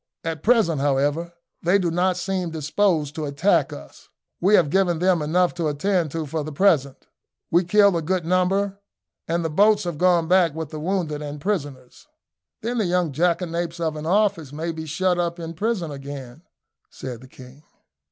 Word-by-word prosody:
"At 165 -3 -4
present, 210 - +3
however, 145 +4 0 0.3
they 175 +4 +3
do 175 -4 -1
not 180 +2 +1
seem 185 -1 -2
disposed 160 -1 0
to 155 0 -4
attack 150 +1 +1
us. 70 - -12 0.3
We 195 +4 +4
have 155 -7 +3
given 185 -2 +2
them 180 -1 +2
enough 175 +4 +1
to 170 -2 -2
attend 165 +3 0
to 165 -1 -2
for 155 +1 -3
the 155 - -6
present. 145 -5 +1 0.5
We 175 +2 +4
killed 200 +1 +4
a 165 - 0
good 175 +1 -1
number, 190 +3 +1 0.5
and 170 0 -1
the - - 0
boats 205 +5 +4
have 170 -4 -4
gone 175 -2 +3
back 175 -4 +3
with 160 -2 -5
the 155 - -7
wounded 160 -3 -2
and 145 0 -6
prisoners." 145 -9 -4 0.6
"Then 240 +1 -1
the 215 - +1
young 175 -2 +1
jackanapes 170 +2 -1
of 160 -2 -1
an 155 +1 -5
officer 190 -7 +1
may 165 +2 -3
be 160 -1 -7
shut 180 +3 0
up 170 0 -2
in 165 0 -6
prison 190 -3 -2
again," 140 -1 -8 0.5
said 125 -3 -8
the 130 - -13
king. 130 +2 -15
170 Hz, 180 wpm, -23 LUFS, 150-185 Hz, 0.6 s, We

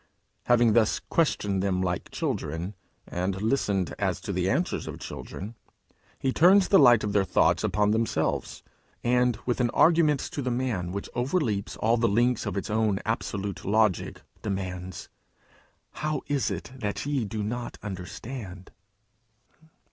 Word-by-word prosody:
Having 120 -2 +4
thus 110 -2 +3
questioned 105 - 0
them 95 -1 0
like 90 -1 -2
children, 80 +6 -3 0.3
and 95 +2 -2
listened 105 -5 0
as - - 0
to - - -4
the - - 0
answers - - -1
of - - -6
children, 105 +4 -7 0.6
he 130 -1 -1
turns 185 +3 +6
the 195 - +7
light 120 -5 +7
of 105 -1 -2
their 100 -1 +4
thoughts 95 - +2
upon 105 0 +2
themselves, 115 +1 -1 0.4
and, 125 -1 +2
with 125 0 0
an 120 - +2
argument 160 -4 +5
to 145 - -4
the 130 - -1
man 120 -8 -1
which 100 +1 -4
overleaps 120 - -1
all 115 +2 +2
the 115 0 +2
links 120 +3 +2
of - - -3
its 100 - -3
own 110 -2 +2
absolute 105 -3 -3
logic, 105 -2 +1 0.2
demands, 95 -3 -4 0.8
'How 155 -2 -2
is 145 -2 0
it 100 +3 -5
that 105 +1 -3
ye 140 -3 0
do 105 0 -3
not 120 +3 -4
understand?' 95 0 -7
110 Hz, 150 wpm, -27 LUFS, 100-125 Hz, 0.8 s, the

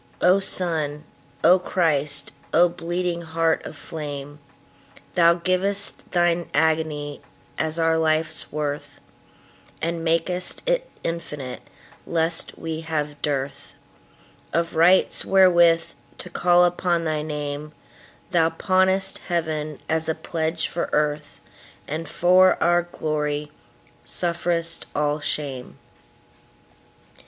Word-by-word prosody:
O 185 +2 +5
Sun, 160 -6 0 0.4
O 185 +1 +6
Christ, 150 -6 0 0.2
O 175 +2 +6
bleeding 175 0 -3
Heart 165 0 0
of 155 - -10
flame! 145 -2 -7 0.7
Thou 170 -1 +5
giv'st 190 +3 0
Thine 175 -1 +1
agony 155 -2 0 0.4
as 160 +1 -1
our 165 0 +2
life's 155 0 0
worth, 145 -1 -4 0.8
And 165 0 -2
mak'st 175 - 0
it - - 0
infinite, 150 -6 -5 0.5
lest 165 0 0
we 160 -1 -4
have 150 -2 -3
dearthOf 140 - -3 1.0
rights 175 +3 +4
wherewith 175 -3 +4 0.3
to 180 - -8
call 175 0 +4
upon 175 -1 0
thy 155 -2 -1
Name; 150 0 -5 0.6
Thou 165 -3 +3
pawnest 190 +3 +1
Heaven 155 -4 -2
as 160 0 +2
a 160 - 0
pledge 160 -1 -2
for 170 - -3
Earth, 150 0 -1 0.5
And 160 +3 -4
for 185 +2 +5
our 175 0 +3
glory 150 -3 -3 0.5
sufferest 170 -1 0
all 150 +1 0
shame. 140 -4 -4
165 Hz, 105 wpm, -23 LUFS, 150-175 Hz, 1.0 s, O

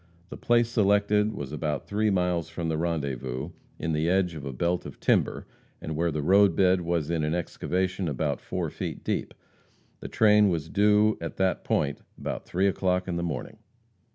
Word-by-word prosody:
The - - -7
place 120 -1 +2
selected 105 -1 +2
was 70 -9 -6
about 75 0 -3
three 105 +1 +1
miles 90 -4 0
from 85 0 -4
the 80 - -1
rendezvous, 70 -7 -3 0.3
in 80 - -2
the 80 +2 +1
edge 90 -1 +2
of 75 -4 -8
a 70 - -4
belt 85 +7 -1
of - - -10
timber, - - +1 0.3
and 80 - -5
where 85 +2 +1
the 75 -2 -2
road 95 +1 +5
bed 95 -1 +3
was 85 -2 -1
in 80 -2 0
an 75 +2 0
excavation 90 +2 -2
about 70 - -2
four - - -3
feet - - -5
deep. - - -2 0.6
The - - -7
train 105 -1 +4
was 80 -3 -2
due 105 +2 +3
at 80 - -6
that 95 -1 0
point - - 0 0.2
about - - -5
three 95 +2 0
o'clock 90 -1 0
in 90 - -2
the 85 - -1
morning. 85 -2 -5
90 Hz, 185 wpm, -27 LUFS, 80-100 Hz, 0.6 s, road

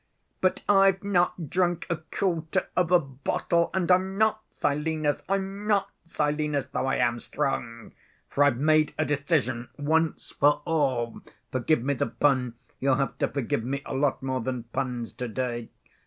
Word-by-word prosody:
But 185 - +1
I've 195 -1 +4
not 175 -4 0
drunk 175 -2 +1
a 170 - -1
quarter 160 0 -1
of 180 -2 +2
a 180 - +7
bottle, 145 +4 -1
and 185 -1 +1
I'm 190 +1 +2
not 215 0 +3
Silenus. 150 0 0
I'm 195 +1 -2
not 205 -2 +2
Silenus, 150 -3 -1
though 130 - 0
I - - +1
am 120 -1 +1
strong, 115 -3 -3 0.4
for 145 - +2
I've 145 -4 +3
made 155 +2 +3
a 155 - +1
decision 140 -5 0
once 160 +2 0
for 145 +1 +3
all. 130 -8 0 0.3
Forgive 130 +1 +1
me 140 +2 +1
the 125 - -1
pun; 125 -1 +1 0.2
you'll 135 0 +3
have 135 0 -2
to - - +2
forgive 125 -4 -2
me 140 +3 -3
a - - -5
lot 135 0 0
more 130 -1 -1
than 125 0 -3
puns 125 -3 -3
to‐day. 120 -1 -3
145 Hz, 160 wpm, -27 LUFS, 130-170 Hz, 0.4 s, a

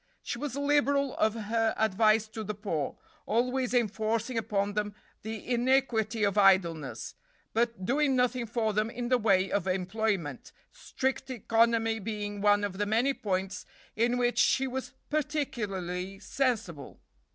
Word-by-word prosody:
She - - -4
was 290 -3 -4
liberal 285 -1 +2
of 220 0 +2
her 225 0 0
advice 220 +1 +3
to 220 0 -6
the 210 0 -4
poor, 190 -8 -3 0.3
always 250 +2 +1
enforcing 230 0 0
upon 205 -2 -1
them 210 0 -2 0.3
the 220 -1 -6
iniquity 240 -3 +1
of 205 0 +2
idleness, 170 -7 +2 0.4
but 230 -4 0
doing 275 +3 +2
nothing 250 -1 +1
for 220 -1 0
them 215 +2 +1
in 240 0 -4
the 255 -1 +3
way 195 -4 +2
of 195 -2 0
employment, 185 - -2 0.2
strict 265 - -3
economy 225 -1 +2
being 205 -1 -4
one 205 0 +4
of 195 -1 -3
the 205 - 0
many 235 +6 +2
points 195 -3 -3 0.3
in 235 +3 +2
which 245 0 +1
she 265 - +3
was 260 0 -5 0.2
particularly 195 - -2
sensible. 220 - -2
220 Hz, 140 wpm, -29 LUFS, 205-250 Hz, 0.4 s, one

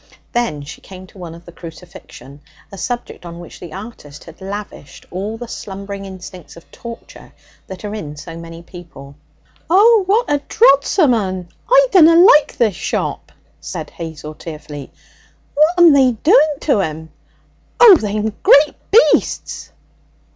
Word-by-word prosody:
Then 230 -12 -2
she 140 - -11
came 185 -1 -12
to 185 - -18
one 170 -2 -8
of 170 +1 -16
the 175 - -12
Crucifixion, 165 -5 -13 0.3
a 195 - -10
subject 245 0 -5
on 170 -1 -9
which 175 - -12
the 175 - -10
artist 190 -8 -11
had 165 +3 -15
lavished 200 -6 -9
all 200 +5 -5
the 240 +1 -8
slumbering 200 -2 -8
instincts 185 -3 -11
of 170 - -17
torture 235 -1 -12 0.3
that 190 +2 -9
are 205 - -5
in 150 -9 -7
so 165 +2 -9
many 165 0 -10
people. 165 -6 -13 0.6
'Oh! 425 +5 +5
what 435 +5 +2
a 290 -1 0
drodsome 295 - +3
un! 185 -5 -3 0.2
I - - +5
dunna 335 -3 +6
like 335 -4 +5
this 225 -4 +2
shop,' - - -4 0.3
said - - -7
Hazel 160 -2 -8
tearfully. 150 -3 -10 0.6
'What'm 330 +2 +5
they 265 -3 +4
doing 310 - +3
to 275 -9 +1
'im? 160 -2 -5 0.7
Oh, 460 -5 +9
they'm 215 -1 -3
great 290 +2 +5 0.2
beasts!' 455 +5 +1
195 Hz, 145 wpm, -17 LUFS, 170-280 Hz, 0.7 s, Oh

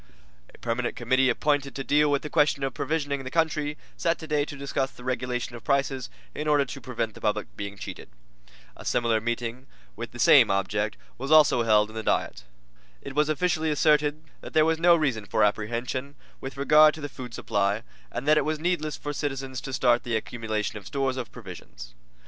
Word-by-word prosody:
A - - -18
permanent - - -2
committee 130 0 +2
appointed 140 +2 0
to 135 - -3
deal 150 +2 +3
with 140 -1 +1
the 150 - -5
question 145 -1 +2
of 135 -2 -1
provisioning 145 -3 -2
the 130 - -5
country, 150 -1 0 0.2
sat 165 0 0
today 150 -3 -1
to 145 - -8
discuss 135 -1 -1
the 125 - -15
regulation 125 -1 -2
of 120 - -10
prices 135 -2 0 0.2
in 155 - -4
order 145 -2 +3
to 135 +1 -8
prevent 115 -3 -3
the - - -13
public 105 0 -2
being 100 0 -6
cheated. - - -8 0.7
A - - -11
similar 115 -2 +1
meeting 120 +2 -3 0.3
with - - -6
the - - -10
same - - +7
object 105 +2 0 0.2
also 150 0 +5
was 115 - 0
held 105 -1 +4
in - - -14
the 110 - -3
Diet. 110 - -1 0.6
It 140 - -7
was 150 +2 +2
officially 160 0 +1
asserted 150 0 +2 0.2
that - - -10
there 155 -1 +5
was 160 0 +1
no 170 0 +6
reason 130 -10 0
for - - +2
apprehension 120 +6 -1 0.2
with 135 +1 -7
regard 150 +2 +6
to 155 - -9
the 145 - -3
food 125 -4 -9
supply, 100 +2 0 0.3
and 130 +4 -5
that 155 0 +6
it - - 0
was 155 0 0
needless 155 -2 -1
for 145 - -5
citizens 135 -3 -3
to 135 - -6
start 120 -1 +3
the 120 -2 -2
accumulation 110 -2 -3
of 100 - -13
stores 135 -2 -1
of 125 -4 -5
provisions. - - -10
135 Hz, 200 wpm, -26 LUFS, 120-150 Hz, 0.7 s, same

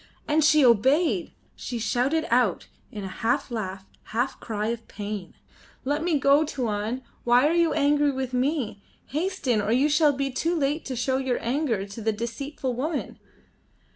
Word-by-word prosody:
"And 305 +1 +3
she 305 -1 +5
obeyed," 245 - +3 0.2
she 245 - -5
shouted 255 +8 0
out 235 -7 +2 0.3
in 205 - -6
a - - -4
half 245 +4 0
laugh, 195 -4 -4 0.2
half 245 +4 -2
cry 215 -1 -3
of 230 -1 -4
pain. 205 -3 -6 0.5
"Let 290 +3 0
me 340 -3 +2
go, 280 +2 +4
Tuan. 235 -3 -2 0.2
Why 245 +4 +5
are 320 - +2
you 335 -2 +3
angry 290 0 +3
with 260 -1 -4
me? 250 -5 -1 0.3
Hasten, 295 - 0
or 205 +1 -1
you 260 +5 +4
shall 300 0 +4
be 275 0 -2
too 330 +7 0
late 295 0 0
to 260 - -4
show 260 +2 0
your 260 -2 0
anger 240 -5 0
to 200 +3 -9
the 220 +1 +1
deceitful 250 +4 -4
woman." 290 +5 -3
260 Hz, 170 wpm, -25 LUFS, 225-295 Hz, 0.5 s, she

